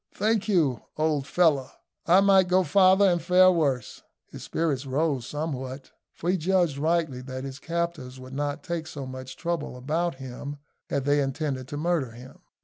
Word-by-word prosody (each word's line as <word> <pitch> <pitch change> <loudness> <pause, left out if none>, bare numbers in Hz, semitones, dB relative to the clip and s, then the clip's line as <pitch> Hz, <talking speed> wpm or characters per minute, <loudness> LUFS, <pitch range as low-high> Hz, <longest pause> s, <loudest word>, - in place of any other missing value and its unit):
"Thank 215 0 +1
you, 160 - +2 0.2
old 150 -3 0
fellow, 155 -7 +2 0.4
I 180 +3 +6
might 195 -2 +5
go 185 +1 +3
farther 190 +4 +5
and 175 -2 +2
fare 185 +2 +6
worse." 140 -10 -1 0.3
His - - -9
spirits 145 -5 -2
rose 135 -2 0
somewhat, 135 -3 -5 0.2
for 175 - -1
he 190 - +1
judged 175 -4 +1
rightly 160 -4 0
that 130 0 -6
his 135 0 -7
captors 170 -7 -3
would 130 +1 -10
not 145 +1 -3
take 170 -2 -4
so 140 -3 -6
much 130 0 -8
trouble 170 -7 -3
about 160 +5 -1
him 135 +2 -7 0.3
had 140 -2 -1
they 145 0 +3
intended 135 -1 -3
to 145 - -6
murder 155 -6 -1
him. 125 +3 -13
150 Hz, 170 wpm, -26 LUFS, 130-175 Hz, 0.4 s, I